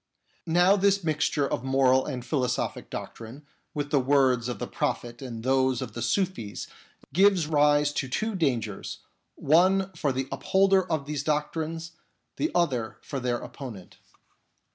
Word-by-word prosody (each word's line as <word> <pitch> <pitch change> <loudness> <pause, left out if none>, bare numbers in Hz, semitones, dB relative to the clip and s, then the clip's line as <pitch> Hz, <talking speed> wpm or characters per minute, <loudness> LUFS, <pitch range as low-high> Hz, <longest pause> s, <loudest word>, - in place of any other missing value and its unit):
Now 175 +4 +5
this 200 0 +2
mixture 150 -2 +1
of 120 - -3
moral 130 0 +3
and 125 -4 -5
philosophic 125 -3 -2
doctrine 120 +6 -8 0.3
with 145 -1 -3
the 145 - +4
words 130 -3 +3
of 120 - -3
the - - -4
Prophet 120 +1 -3
and 115 -4 -6
those 130 -1 +2
of - - -5
the 120 - -5
Sufis 120 - -1 0.5
gives 190 -1 +4
rise 145 -1 +3
to 135 - -2
two 220 - -1
dangers, 125 - -2 0.3
one 185 +5 +3
ior 145 - +3
the 130 0 -2
upholder 190 -1 +2
of 155 -3 0
those 150 -1 -3
doctrines, 160 +2 -2 0.5
the 310 - 0
other 130 -10 0
for 140 - -4
their 125 -1 -1
opponent. 115 -9 -9
145 Hz, 145 wpm, -27 LUFS, 125-165 Hz, 0.5 s, Now